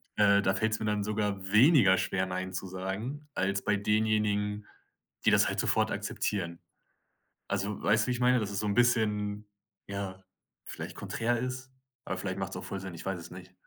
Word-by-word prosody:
Äh, 100 Hz, -1 st, +5 dB
da 95 Hz, -1 st, +2 dB
fällt's 110 Hz, +2 st, 0 dB
mir 110 Hz, -, -3 dB
dann 105 Hz, -1 st, 0 dB
sogar 105 Hz, -2 st, -2 dB
weniger 110 Hz, -, +6 dB
schwer, 95 Hz, 0 st, 0 dB
„Nein“ 95 Hz, 0 st, -4 dB
zu 95 Hz, -, -3 dB
sagen, 95 Hz, +11 st, -5 dB
als 95 Hz, +1 st, 0 dB
bei 105 Hz, -, +2 dB
denjenigen, 105 Hz, 0 st, +1 dB, 0.6 s
die -, -, +6 dB
das -, -, +5 dB
halt -, -, -2 dB
sofort -, -, +2 dB
akzeptieren. 85 Hz, -4 st, -2 dB, 0.9 s
Also, 100 Hz, +1 st, -2 dB
weißt 105 Hz, +5 st, +3 dB
du, -, -, -8 dB
wie -, -, +1 dB
ich 125 Hz, -, -2 dB
meine? 125 Hz, 0 st, +4 dB
Das 105 Hz, -2 st, -3 dB
ist 100 Hz, -, -2 dB
so 105 Hz, -, -1 dB
'n 100 Hz, -, +1 dB
bisschen, 105 Hz, -4 st, +1 dB, 0.4 s
ja, 95 Hz, -1 st, -5 dB, 0.4 s
vielleicht -, -, -7 dB
konträr 120 Hz, +1 st, -1 dB
ist? 130 Hz, +1 st, -4 dB, 0.3 s
Aber -, -, -3 dB
vielleicht -, -, -3 dB
macht's -, -, -4 dB
auch -, -, -6 dB
voll 100 Hz, -, -4 dB
Sinn, 95 Hz, -1 st, -7 dB
ich 85 Hz, -, -9 dB
weiß 95 Hz, -2 st, -2 dB
es 85 Hz, -, -11 dB
nicht. 90 Hz, 0 st, -11 dB
105 Hz, 195 wpm, -30 LUFS, 95-110 Hz, 0.9 s, weniger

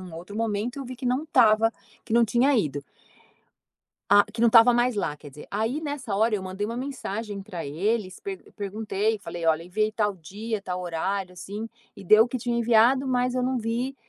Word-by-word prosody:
um 160 Hz, -, -10 dB
outro 180 Hz, +5 st, -9 dB
momento 225 Hz, +3 st, -2 dB
eu 275 Hz, -, -5 dB
vi 255 Hz, +1 st, -8 dB
que 250 Hz, +1 st, -5 dB
não 255 Hz, +5 st, 0 dB
tava, 225 Hz, -5 st, +4 dB, 0.3 s
que 220 Hz, -, -7 dB
não 235 Hz, 0 st, +5 dB
tinha 245 Hz, +6 st, +2 dB
ido. 145 Hz, -7 st, -2 dB, 1.3 s
Ah, 205 Hz, 0 st, +7 dB
que 225 Hz, -, -4 dB
não 235 Hz, -, +6 dB
estava 230 Hz, +1 st, +7 dB
mais 240 Hz, -1 st, +2 dB
lá 150 Hz, -7 st, -1 dB
quer 145 Hz, 0 st, -12 dB
dizer, 150 Hz, +2 st, -12 dB
aí 225 Hz, +8 st, -1 dB
nessa 285 Hz, -8 st, -4 dB
hora, 220 Hz, +2 st, +2 dB
eu 205 Hz, -, 0 dB
mandei 190 Hz, +2 st, -4 dB
uma 230 Hz, +2 st, -4 dB
mensagem 225 Hz, -6 st, -5 dB
para 180 Hz, -5 st, -6 dB
eles, 185 Hz, +6 st, -2 dB, 0.4 s
perguntei 210 Hz, +1 st, -2 dB
e -, -, -29 dB
falei: 175 Hz, -4 st, -6 dB
"Olha, 160 Hz, 0 st, +3 dB
enviei 215 Hz, +5 st, -1 dB
tal 210 Hz, -2 st, 0 dB
dia, 205 Hz, +6 st, -5 dB
tal 180 Hz, -1 st, -4 dB
horário 180 Hz, +2 st, -3 dB
assim, 205 Hz, +5 st, -7 dB, 0.3 s
e -, -, -11 dB
deu 215 Hz, +5 st, +6 dB
que 255 Hz, +1 st, -4 dB
tinha 240 Hz, 0 st, -1 dB
enviado 235 Hz, +3 st, +4 dB
mas 250 Hz, 0 st, +1 dB
eu 255 Hz, -, 0 dB
não 255 Hz, 0 st, 0 dB
vi, 235 Hz, +4 st, -2 dB
220 Hz, 205 wpm, -25 LUFS, 195-240 Hz, 1.3 s, Ah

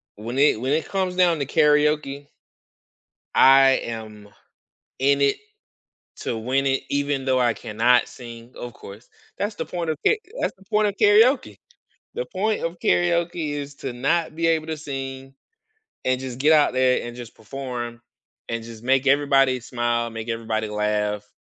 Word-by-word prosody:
when 115 Hz, +5 st, -6 dB
it 140 Hz, -5 st, +4 dB
when 130 Hz, +3 st, 0 dB
it 160 Hz, -, 0 dB
comes 185 Hz, -2 st, -1 dB
down 175 Hz, -3 st, +3 dB
to 140 Hz, -, -1 dB
karaoke 150 Hz, -1 st, +2 dB, 1.1 s
I 135 Hz, 0 st, +6 dB
am 110 Hz, -2 st, -8 dB, 0.7 s
in 140 Hz, +1 st, +2 dB
it 140 Hz, 0 st, +3 dB, 0.8 s
to 115 Hz, -, -4 dB
win 130 Hz, +5 st, 0 dB
it 135 Hz, 0 st, 0 dB
even 140 Hz, -1 st, -1 dB
though 130 Hz, -1 st, +2 dB
I 120 Hz, -2 st, +2 dB
cannot 115 Hz, +4 st, +2 dB
sing, 120 Hz, 0 st, -11 dB
of 120 Hz, -1 st, -7 dB
course. 105 Hz, +2 st, -13 dB, 0.3 s
That's 205 Hz, +1 st, -3 dB
the -, -, -4 dB
point 175 Hz, -2 st, -4 dB
of 155 Hz, -, -1 dB
ka -, -, +6 dB, 0.3 s
that's -, -, -1 dB
the 195 Hz, -, -21 dB
point 210 Hz, +2 st, +2 dB
of 200 Hz, -, -3 dB
karaoke. 220 Hz, +6 st, +4 dB, 0.6 s
The 485 Hz, -, -3 dB
point 210 Hz, +3 st, -1 dB
of 165 Hz, +1 st, -3 dB
karaoke 170 Hz, -2 st, +1 dB
is 145 Hz, -1 st, -6 dB
to 135 Hz, -3 st, -6 dB
not 155 Hz, +6 st, 0 dB
be 165 Hz, 0 st, 0 dB
able 160 Hz, -1 st, +1 dB
to 160 Hz, -1 st, -3 dB
sing 135 Hz, -2 st, -7 dB, 0.7 s
and 130 Hz, 0 st, +1 dB
just 130 Hz, -2 st, -6 dB
get 150 Hz, +4 st, +4 dB
out 150 Hz, -4 st, +4 dB
there 130 Hz, -1 st, +2 dB
and 120 Hz, 0 st, -8 dB
just 120 Hz, -2 st, -10 dB
perform 120 Hz, 0 st, -6 dB, 0.5 s
and 115 Hz, -1 st, -4 dB
just 115 Hz, -1 st, -11 dB
make 135 Hz, +2 st, +2 dB
everybody 135 Hz, -2 st, +3 dB
smile, 120 Hz, -1 st, -1 dB
make 115 Hz, 0 st, -7 dB
everybody 110 Hz, -1 st, -2 dB
laugh. 105 Hz, 0 st, -1 dB
135 Hz, 165 wpm, -23 LUFS, 120-155 Hz, 1.1 s, I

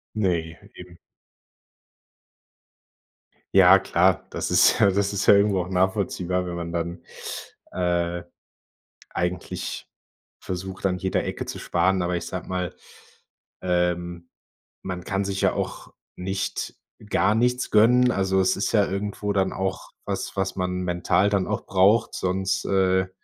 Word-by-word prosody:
Ne, 85 Hz, -6 st, -1 dB, 0.2 s
eben. 90 Hz, -1 st, -12 dB, 2.6 s
Ja, 95 Hz, 0 st, +8 dB
klar. 95 Hz, -1 st, +2 dB
Das -, -, -3 dB
ist -, -, +5 dB
ja 100 Hz, -, +5 dB
das 100 Hz, +1 st, 0 dB
ist 100 Hz, -, -1 dB
ja -, -, +8 dB
irgendwo 100 Hz, -2 st, +3 dB
auch 90 Hz, -, -8 dB
nachvollziehbar, 90 Hz, -1 st, 0 dB
wenn 90 Hz, -1 st, -5 dB
man 85 Hz, -1 st, -5 dB
dann, 85 Hz, 0 st, -3 dB, 0.7 s
äh, 85 Hz, -1 st, -1 dB, 0.9 s
eigentlich 90 Hz, +1 st, -4 dB, 0.5 s
versucht, 95 Hz, +1 st, -6 dB
an 90 Hz, -1 st, +1 dB
jeder 95 Hz, -, 0 dB
Ecke -, -, -4 dB
zu -, -, -6 dB
sparen. 95 Hz, 0 st, +1 dB
Aber 90 Hz, 0 st, -1 dB
ich 85 Hz, 0 st, -4 dB
sage 90 Hz, -2 st, -6 dB
mal, 90 Hz, -2 st, -3 dB, 0.9 s
ähm, 90 Hz, -1 st, -1 dB, 0.5 s
man 90 Hz, -1 st, -5 dB
kann 100 Hz, 0 st, -1 dB
sich 95 Hz, 0 st, -2 dB
ja -, -, +3 dB
auch -, -, -5 dB, 0.2 s
nicht, 95 Hz, +1 st, -3 dB, 0.3 s
gar 105 Hz, -, +3 dB
nichts 125 Hz, +2 st, +1 dB
gönnen. 125 Hz, +3 st, +5 dB
Also, 95 Hz, -2 st, +1 dB
es 95 Hz, -, +2 dB
ist 100 Hz, -, -1 dB
ja 105 Hz, -3 st, +4 dB
irgendwo 100 Hz, +1 st, -3 dB
dann 95 Hz, -1 st, +1 dB
auch 95 Hz, 0 st, -3 dB
was, -, -, -4 dB
was 95 Hz, 0 st, -1 dB
man 90 Hz, 0 st, -1 dB
mental 90 Hz, +2 st, +1 dB
dann 100 Hz, -2 st, 0 dB
auch -, -, -3 dB
braucht, 100 Hz, +4 st, +3 dB
sonst 95 Hz, +1 st, -1 dB
äh 95 Hz, -1 st, +2 dB
95 Hz, 140 wpm, -24 LUFS, 90-100 Hz, 2.6 s, Ja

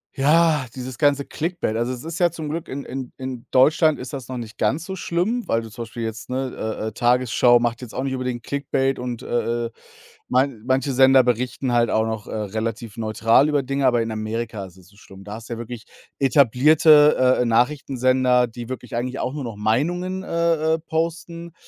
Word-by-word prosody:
Ja, 150 Hz, 0 st, +3 dB
dieses 130 Hz, -1 st, -7 dB
ganze 145 Hz, -2 st, +2 dB
Clickbait. 165 Hz, -8 st, -3 dB
Also, 120 Hz, +2 st, -1 dB
es 125 Hz, -1 st, -6 dB
ist 165 Hz, 0 st, -6 dB
ja 175 Hz, -1 st, +4 dB
zum 160 Hz, -2 st, -6 dB
Glück 165 Hz, +2 st, -4 dB
in 140 Hz, +1 st, -5 dB
in 130 Hz, 0 st, -6 dB
in 130 Hz, -2 st, -7 dB
Deutschland 155 Hz, +4 st, +4 dB
ist 125 Hz, +2 st, -8 dB
das 135 Hz, -4 st, -6 dB
noch 130 Hz, -1 st, -5 dB
nicht 110 Hz, -2 st, -8 dB
ganz 155 Hz, +5 st, 0 dB
so 190 Hz, -, -5 dB
schlimm, 190 Hz, +7 st, -1 dB
weil 115 Hz, -, +1 dB
du 110 Hz, -, -10 dB
zum 115 Hz, +3 st, -6 dB
Beispiel 115 Hz, +1 st, -7 dB
jetzt, 110 Hz, 0 st, -6 dB
ne, 130 Hz, 0 st, -3 dB
äh, 110 Hz, 0 st, -4 dB
äh, -, -, -13 dB
Tagesschau 120 Hz, +1 st, +3 dB
macht 120 Hz, 0 st, -1 dB
jetzt 125 Hz, -3 st, -9 dB
auch 130 Hz, -, -2 dB
nicht 135 Hz, -1 st, -2 dB
unbedingt 125 Hz, -2 st, -3 dB
Clickbait 135 Hz, -1 st, -1 dB
und, 125 Hz, -2 st, -5 dB
äh, 120 Hz, 0 st, -1 dB
äh, -, -, -4 dB, 0.6 s
man 130 Hz, -3 st, +1 dB
manche 135 Hz, +2 st, +1 dB
Sender 130 Hz, 0 st, +6 dB
berichten 125 Hz, +1 st, -1 dB
halt 120 Hz, -1 st, +3 dB
auch 110 Hz, 0 st, +1 dB
noch, 110 Hz, -2 st, -4 dB
äh, -, -, -6 dB
relativ 110 Hz, +1 st, -4 dB
neutral 115 Hz, +5 st, +3 dB
über 145 Hz, -2 st, +1 dB
Dinge, 135 Hz, +1 st, 0 dB
aber 120 Hz, -2 st, +3 dB
in 115 Hz, -, -4 dB
Amerika 110 Hz, -1 st, -4 dB
ist 95 Hz, -1 st, -15 dB
es 90 Hz, -1 st, -18 dB
so 100 Hz, -, -22 dB
schlimm. 95 Hz, -2 st, -14 dB
Da 105 Hz, +1 st, -8 dB
hast 115 Hz, +2 st, -9 dB
du -, -, -3 dB
ja -, -, -6 dB
wirklich 120 Hz, 0 st, -8 dB, 0.3 s
etablierte, 140 Hz, +1 st, +5 dB
äh, -, -, +1 dB
Nachrichtensender, 125 Hz, 0 st, +2 dB
die 120 Hz, 0 st, -9 dB
wirklich 125 Hz, -2 st, -6 dB
eigentlich 125 Hz, +2 st, -3 dB
auch 130 Hz, -, -2 dB
nur 145 Hz, -1 st, -5 dB
noch 115 Hz, -3 st, -6 dB
Meinungen, 170 Hz, -, -1 dB
äh, 165 Hz, -3 st, +1 dB
äh, -, -, -6 dB
posten, 165 Hz, +1 st, -4 dB
125 Hz, 210 wpm, -22 LUFS, 115-145 Hz, 0.6 s, Sender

